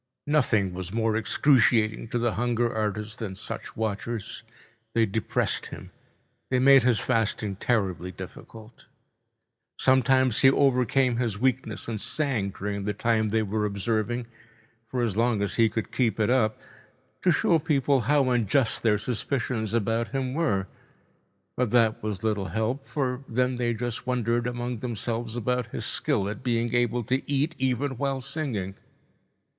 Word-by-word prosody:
Nothing 115 Hz, -10 st, +2 dB
was 90 Hz, 0 st, -6 dB
more 110 Hz, 0 st, 0 dB
excruciating 115 Hz, -2 st, +3 dB
to 120 Hz, +2 st, -2 dB
the 120 Hz, -2 st, 0 dB
hunger 120 Hz, 0 st, 0 dB
artist 105 Hz, +1 st, -2 dB
than 100 Hz, -5 st, -4 dB
such -, -, -7 dB
watchers. 110 Hz, 0 st, -3 dB, 0.5 s
They 115 Hz, -1 st, +4 dB
depressed 110 Hz, +1 st, -1 dB
him. -, -, -10 dB, 0.6 s
They 130 Hz, -, +2 dB
made 135 Hz, +1 st, +7 dB
his 120 Hz, -2 st, +3 dB
fasting 110 Hz, -4 st, 0 dB
terribly 95 Hz, -7 st, -1 dB
difficult. 110 Hz, +5 st, -11 dB, 0.9 s
Sometimes 130 Hz, -2 st, +3 dB
he 135 Hz, -, +7 dB
overcame 130 Hz, -2 st, +2 dB
his 115 Hz, -5 st, -1 dB
weakness 125 Hz, -3 st, -1 dB
and 110 Hz, -3 st, -3 dB
sang 130 Hz, -10 st, -1 dB
during 100 Hz, +1 st, -4 dB
the 105 Hz, 0 st, -2 dB
time 110 Hz, 0 st, +1 dB
they 110 Hz, +1 st, +1 dB
were 105 Hz, +1 st, -1 dB
observing, 110 Hz, +3 st, -1 dB, 0.6 s
for 125 Hz, 0 st, -2 dB
as 110 Hz, -5 st, -1 dB
long 115 Hz, -2 st, +1 dB
as 100 Hz, -, -2 dB
he 115 Hz, -1 st, +5 dB
could 110 Hz, +1 st, -4 dB
keep 115 Hz, -5 st, 0 dB
it 110 Hz, +2 st, +2 dB
up, 110 Hz, -4 st, +2 dB, 0.6 s
to 185 Hz, -, +2 dB
show 165 Hz, 0 st, +3 dB
people 145 Hz, -3 st, +2 dB
how 140 Hz, +3 st, +2 dB
unjust 120 Hz, +1 st, +1 dB
their 110 Hz, -2 st, +3 dB
suspicions 115 Hz, -1 st, -2 dB
about 115 Hz, +1 st, 0 dB
him 130 Hz, -2 st, -2 dB
were. 135 Hz, -12 st, 0 dB, 0.9 s
But 125 Hz, -2 st, 0 dB
that 115 Hz, -1 st, +3 dB
was 105 Hz, -2 st, -4 dB
little 105 Hz, -3 st, 0 dB
help. 115 Hz, +7 st, -2 dB
For 130 Hz, -2 st, -2 dB
then 125 Hz, +2 st, 0 dB
they 120 Hz, -1 st, 0 dB
just 120 Hz, +1 st, -4 dB
wondered 120 Hz, -1 st, 0 dB
among 120 Hz, -1 st, -3 dB
themselves 115 Hz, -1 st, -3 dB
about 125 Hz, 0 st, -1 dB
his -, -, -4 dB
skill 120 Hz, -10 st, +1 dB
at 100 Hz, 0 st, -5 dB
being 120 Hz, -2 st, 0 dB
able 120 Hz, 0 st, +1 dB
to 130 Hz, +5 st, 0 dB
eat 145 Hz, +4 st, +1 dB
even 130 Hz, +1 st, 0 dB
while 135 Hz, -1 st, -1 dB
singing. 125 Hz, -9 st, -3 dB
115 Hz, 150 wpm, -26 LUFS, 110-130 Hz, 0.9 s, made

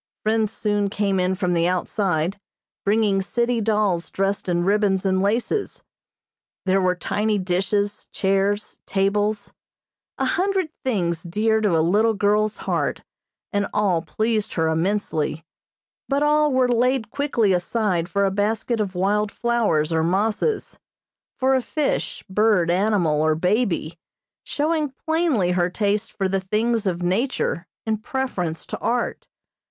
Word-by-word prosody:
Friends 220 Hz, -1 st, +1 dB
soon 205 Hz, -2 st, 0 dB
came 200 Hz, -1 st, 0 dB
in 185 Hz, +1 st, +1 dB
from 180 Hz, -2 st, 0 dB
the 170 Hz, 0 st, +2 dB
outside, 185 Hz, -1 st, -1 dB, 0.4 s
bringing 205 Hz, -1 st, +2 dB
city 235 Hz, +4 st, 0 dB
dolls 205 Hz, -6 st, +1 dB
dressed 195 Hz, 0 st, -1 dB
in 175 Hz, 0 st, +1 dB
ribbons 195 Hz, 0 st, +2 dB
and 190 Hz, -1 st, +2 dB
laces; 230 Hz, -, -1 dB, 0.8 s
there 190 Hz, +1 st, +3 dB
were 180 Hz, -1 st, +2 dB
tiny 210 Hz, +4 st, 0 dB
dishes, 195 Hz, +2 st, -1 dB
chairs, 195 Hz, +2 st, 0 dB
tables, 205 Hz, +2 st, 0 dB, 0.6 s
a -, -, 0 dB
hundred 380 Hz, -2 st, 0 dB
things 175 Hz, -10 st, 0 dB
dear 220 Hz, +6 st, +1 dB
to 195 Hz, -6 st, +2 dB
a 160 Hz, -, +2 dB
little 215 Hz, +5 st, +3 dB
girl's 210 Hz, +1 st, +1 dB
heart, -, -, -1 dB, 0.5 s
and 205 Hz, -1 st, +1 dB
all 195 Hz, -5 st, +2 dB
pleased 215 Hz, +5 st, -1 dB
her 160 Hz, -1 st, +1 dB
immensely, 160 Hz, -2 st, -1 dB, 0.6 s
but 280 Hz, +1 st, +1 dB
all 300 Hz, 0 st, +3 dB
were 260 Hz, -1 st, +3 dB
laid 245 Hz, -1 st, +1 dB
quickly 240 Hz, -8 st, +1 dB
aside 180 Hz, -1 st, 0 dB
for 200 Hz, +2 st, +1 dB
a 195 Hz, -, +1 dB
basket 220 Hz, +3 st, -1 dB
of 195 Hz, -3 st, -2 dB
wild 205 Hz, +3 st, +1 dB
flowers 210 Hz, -10 st, +1 dB
or 160 Hz, -, +2 dB
mosses, 210 Hz, -, 0 dB, 0.6 s
for 265 Hz, 0 st, +2 dB
a 260 Hz, -, +3 dB
fish, 300 Hz, +3 st, -2 dB
bird, 195 Hz, -4 st, +2 dB
animal 180 Hz, -5 st, +2 dB
or 155 Hz, 0 st, +2 dB
baby, 180 Hz, -2 st, 0 dB, 0.4 s
showing 305 Hz, -1 st, -1 dB
plainly 320 Hz, -, +2 dB
her 180 Hz, 0 st, +1 dB
taste 205 Hz, +3 st, -1 dB
for 195 Hz, -, -1 dB
the 190 Hz, 0 st, -1 dB
things 215 Hz, +3 st, 0 dB
of 175 Hz, -1 st, -1 dB
nature 185 Hz, -2 st, -1 dB, 0.2 s
in 220 Hz, -1 st, -1 dB
preference 220 Hz, -, -3 dB
to -, -, -6 dB
art. 240 Hz, 0 st, -2 dB
205 Hz, 140 wpm, -23 LUFS, 180-225 Hz, 0.8 s, there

